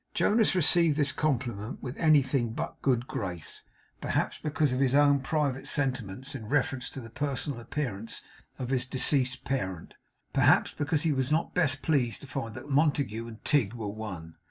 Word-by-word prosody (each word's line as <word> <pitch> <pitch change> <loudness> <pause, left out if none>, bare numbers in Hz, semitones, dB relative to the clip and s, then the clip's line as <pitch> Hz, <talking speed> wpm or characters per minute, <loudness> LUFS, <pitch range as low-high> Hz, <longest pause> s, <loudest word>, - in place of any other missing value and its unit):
Jonas 220 -2 +3
received 170 -3 +5
this 145 -2 +3
compliment 120 -6 -2
with 125 +1 -5
anything 135 -6 +3
but - - -3
a - - -29
good 125 -3 +1
grace, 95 - -5 0.4
perhaps - - -1
because 150 -3 0
of 130 - -1
his 135 -1 +2
own 145 -1 +5
private 135 -1 -1
sentiments 130 -3 -2
in 110 - -7
reference 135 -2 0
to - - -8
the 115 -3 -10
personal 145 -1 -2
appearance 115 -4 -4 0.3
of 125 0 -4
his 130 -1 0
deceased 130 0 +1
parent; 95 -11 -3 0.4
perhaps - - +4
because 145 0 0
he 165 - +2
was 130 0 0
not 160 +2 +1
best 145 -6 +1
pleased 130 -7 +1
to 140 - -10
find 130 -5 -5
that - - -8
Montague 140 -6 +1
and 110 -1 -12
Tigg 135 -9 +2
were 110 -3 -4
one. 95 -6 -7
135 Hz, 175 wpm, -29 LUFS, 115-145 Hz, 0.4 s, received